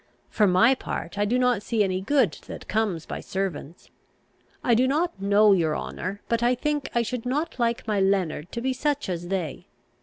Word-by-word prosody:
For 210 Hz, -2 st, +3 dB
my 195 Hz, +8 st, +5 dB
part, 200 Hz, -7 st, -5 dB
I 205 Hz, -, +3 dB
do 235 Hz, +5 st, +1 dB
not 250 Hz, -4 st, +2 dB
see 220 Hz, 0 st, +1 dB
any 185 Hz, -1 st, -1 dB
good 245 Hz, -, +2 dB, 0.2 s
that -, -, -8 dB
comes 205 Hz, -7 st, -1 dB
by -, -, -5 dB
servants. 185 Hz, -4 st, -5 dB, 0.7 s
I 240 Hz, -, +3 dB
do 250 Hz, +3 st, +4 dB
not 310 Hz, -, 0 dB
know, 205 Hz, +1 st, +5 dB
your 160 Hz, -5 st, +1 dB
honour, 190 Hz, +4 st, -5 dB
but, 230 Hz, 0 st, 0 dB
I 245 Hz, +1 st, +3 dB
think, 295 Hz, +2 st, -2 dB
I 235 Hz, -, +3 dB
should 240 Hz, 0 st, -4 dB
not 275 Hz, +3 st, -2 dB
like 235 Hz, -1 st, 0 dB
my 210 Hz, -2 st, +1 dB
Leonard 185 Hz, -5 st, 0 dB
to 235 Hz, -, -3 dB
be 260 Hz, +1 st, 0 dB
such 290 Hz, -2 st, -1 dB
as 175 Hz, -1 st, -3 dB
they. 175 Hz, -3 st, -3 dB
215 Hz, 195 wpm, -25 LUFS, 190-250 Hz, 0.7 s, my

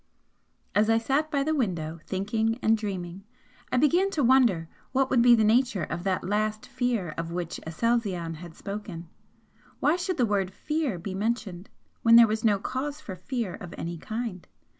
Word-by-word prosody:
As 210 Hz, +2 st, +3 dB
I 225 Hz, -, +5 dB
sat 275 Hz, +7 st, 0 dB
by 280 Hz, -2 st, +1 dB
the 315 Hz, +2 st, 0 dB
window 170 Hz, -, -2 dB
thinking 220 Hz, +4 st, 0 dB
and 225 Hz, -, +5 dB
dreaming, 190 Hz, -3 st, -5 dB, 0.5 s
I -, -, +2 dB
began 340 Hz, +8 st, +3 dB
to 290 Hz, -, +3 dB
wonder 235 Hz, -10 st, +4 dB, 0.3 s
what 265 Hz, 0 st, +2 dB
would 250 Hz, -3 st, +4 dB
be 240 Hz, 0 st, +7 dB
the 220 Hz, -, +3 dB
nature 225 Hz, -3 st, +3 dB
of 170 Hz, +3 st, -4 dB
that 190 Hz, -1 st, 0 dB
'last 215 Hz, +3 st, -1 dB
fear' 240 Hz, -10 st, -1 dB
of 165 Hz, 0 st, -4 dB
which 175 Hz, -1 st, -4 dB
Aselzion 180 Hz, -3 st, -1 dB
had 170 Hz, 0 st, -10 dB
spoken? 195 Hz, -5 st, -7 dB, 0.7 s
Why 310 Hz, +4 st, +3 dB
should 365 Hz, 0 st, -2 dB
the 245 Hz, -, +3 dB
word 200 Hz, -3 st, 0 dB
'fear' 300 Hz, -, -2 dB
be 185 Hz, +3 st, -6 dB
mentioned, 205 Hz, -3 st, -3 dB, 0.3 s
when 230 Hz, 0 st, +6 dB
there 235 Hz, 0 st, +10 dB
was 220 Hz, 0 st, -2 dB
no 210 Hz, -3 st, +4 dB
cause 275 Hz, +8 st, -4 dB
for 205 Hz, -11 st, -7 dB
fear 215 Hz, +2 st, -3 dB
of 175 Hz, -3 st, -9 dB
any 170 Hz, 0 st, -5 dB
kind? 220 Hz, -2 st, -5 dB
215 Hz, 180 wpm, -27 LUFS, 180-245 Hz, 0.7 s, there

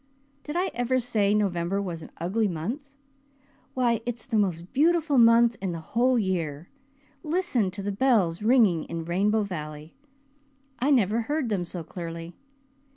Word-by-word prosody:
Did 295 Hz, +2 st, -7 dB
I 365 Hz, +2 st, 0 dB
ever 245 Hz, +2 st, +1 dB
say 215 Hz, -4 st, +1 dB
November 195 Hz, -2 st, 0 dB
was 175 Hz, -5 st, -4 dB
an -, -, -10 dB
ugly 200 Hz, +6 st, 0 dB
month? 220 Hz, -, -4 dB, 0.9 s
Why 240 Hz, -3 st, +1 dB
it's 235 Hz, -1 st, -5 dB
the 255 Hz, -4 st, -3 dB
most 185 Hz, -3 st, 0 dB
beautiful 310 Hz, -1 st, +3 dB
month 230 Hz, 0 st, +6 dB
in 190 Hz, -3 st, -2 dB
the 165 Hz, -, -5 dB
whole 245 Hz, +9 st, +1 dB
year. 170 Hz, -6 st, -2 dB, 0.5 s
Listen 305 Hz, -, 0 dB
to 195 Hz, +2 st, -7 dB
the 205 Hz, -, -2 dB
bells 200 Hz, -7 st, +2 dB
ringing 215 Hz, -8 st, +3 dB
in 165 Hz, -1 st, -5 dB
Rainbow 205 Hz, +5 st, +1 dB
Valley! 155 Hz, -4 st, -7 dB, 0.9 s
I 265 Hz, -, +1 dB
never 230 Hz, -4 st, +3 dB
heard 290 Hz, +1 st, -2 dB
them 190 Hz, -4 st, -1 dB
so 170 Hz, 0 st, -6 dB
clearly. 165 Hz, 0 st, -7 dB
210 Hz, 155 wpm, -26 LUFS, 175-245 Hz, 0.9 s, month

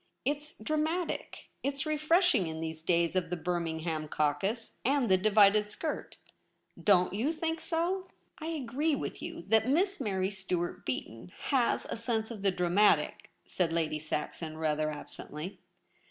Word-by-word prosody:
It's 295 Hz, +2 st, -2 dB
dramatic; 310 Hz, +8 st, -2 dB
it's 275 Hz, +2 st, -1 dB
refresh 325 Hz, +4 st, +3 dB
ing 185 Hz, -, +2 dB
in 160 Hz, 0 st, -5 dB
these 160 Hz, 0 st, -4 dB
days 170 Hz, +1 st, +2 dB
of 180 Hz, -3 st, +1 dB
the 180 Hz, -, -1 dB
Birmingham 165 Hz, -2 st, -2 dB
caucus 155 Hz, +11 st, -1 dB
and 270 Hz, -3 st, +2 dB
the -, -, +8 dB
divided 210 Hz, +1 st, +5 dB
skirt; 305 Hz, +9 st, -4 dB, 0.7 s
don't 180 Hz, -3 st, +4 dB
you 235 Hz, +10 st, +1 dB
think 325 Hz, 0 st, -2 dB
so 360 Hz, +3 st, -1 dB
?' -, -, -40 dB
' -, -, -24 dB
I 315 Hz, -, -5 dB
agree 295 Hz, 0 st, 0 dB
with -, -, -5 dB
you 335 Hz, 0 st, -6 dB
that 220 Hz, +1 st, +4 dB
Miss 375 Hz, +5 st, +2 dB
Mary 190 Hz, -4 st, 0 dB
Stuart 185 Hz, -3 st, -3 dB
Beaton 125 Hz, +4 st, -4 dB, 0.2 s
has 255 Hz, -4 st, +2 dB
a -, -, -4 dB
sense 225 Hz, -1 st, -1 dB
of 215 Hz, -4 st, -7 dB
the 200 Hz, -, +3 dB
dramatic,' 180 Hz, +3 st, +2 dB, 0.2 s
said 175 Hz, -3 st, 0 dB
Lady 160 Hz, -2 st, 0 dB
Saxon 155 Hz, +1 st, -4 dB
rather 155 Hz, -1 st, +1 dB
absently. 150 Hz, +3 st, -7 dB
205 Hz, 155 wpm, -31 LUFS, -, 0.7 s, the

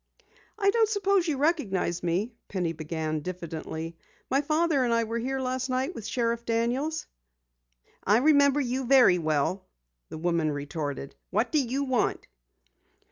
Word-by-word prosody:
"I 400 Hz, -2 st, +3 dB
don't 445 Hz, 0 st, +3 dB
suppose 395 Hz, -3 st, +2 dB
you 300 Hz, -4 st, 0 dB
recognize 230 Hz, -, 0 dB
me," 185 Hz, +7 st, -1 dB
Penny 180 Hz, -4 st, -2 dB
began 155 Hz, 0 st, -3 dB
diffidently. 165 Hz, -1 st, -6 dB, 0.3 s
"My 270 Hz, +2 st, +3 dB
father 305 Hz, -1 st, +2 dB
and 240 Hz, -, +1 dB
I 230 Hz, 0 st, +3 dB
were 230 Hz, +1 st, -3 dB
here 265 Hz, +3 st, -2 dB
last 255 Hz, 0 st, -2 dB
night 260 Hz, +6 st, -1 dB
with 225 Hz, -, -7 dB
Sheriff 235 Hz, -1 st, -1 dB
Daniels." 245 Hz, +7 st, -1 dB, 1.0 s
"I 205 Hz, +3 st, +4 dB
remember 285 Hz, +1 st, +4 dB
you 260 Hz, 0 st, -2 dB
very 250 Hz, -9 st, +6 dB
well," 155 Hz, +4 st, 0 dB, 0.4 s
the -, -, -7 dB
woman 165 Hz, -1 st, 0 dB
retorted. 145 Hz, -1 st, -4 dB, 0.2 s
"What 245 Hz, -, 0 dB
do 310 Hz, -, +3 dB
you 260 Hz, +3 st, -1 dB
want?" 260 Hz, -4 st, 0 dB
235 Hz, 145 wpm, -27 LUFS, 170-280 Hz, 1.0 s, very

